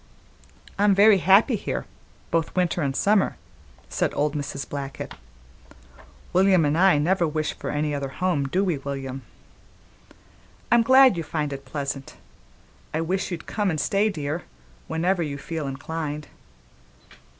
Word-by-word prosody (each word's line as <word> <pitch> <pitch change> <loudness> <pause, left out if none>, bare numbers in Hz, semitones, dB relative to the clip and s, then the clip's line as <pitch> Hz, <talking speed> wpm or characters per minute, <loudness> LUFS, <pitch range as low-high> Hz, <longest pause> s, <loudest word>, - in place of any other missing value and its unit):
"I'm 205 -1 +4
very 205 0 +6
happy 195 - +5
here, 200 - -3 0.5
both 165 -1 0
winter 180 -1 +1
an' 135 -2 -1
summer," 200 +3 +2 0.5
said - - -1
old 150 0 +1
Mrs. 140 -2 -4
Blackett. 140 -1 -6 1.2
"William 185 -2 +4
an' 145 +1 +1
I 185 -1 +5
never 170 +3 +2
wish 155 0 -2
for - - -6
any 150 0 -1
other 140 -1 -2
home, 145 -2 -1
do 185 +8 +1
we, 175 -7 0
William? 135 -1 -5 1.5
I'm 235 - +6
glad 260 -3 +6
you 165 - -2
find 150 -2 -3
it 140 0 -8
pleasant; 140 -2 -5 0.8
I 160 - 0
wish 185 +3 -1
you'd 175 -3 -6
come 210 -3 -1
an' 160 - -1
stay, 200 +8 +1
dear, 155 -2 -4 0.4
whenever 175 +3 0
you 145 -3 -3
feel 155 0 -5
inclined. 150 +2 -5
160 Hz, 140 wpm, -24 LUFS, 145-190 Hz, 1.5 s, very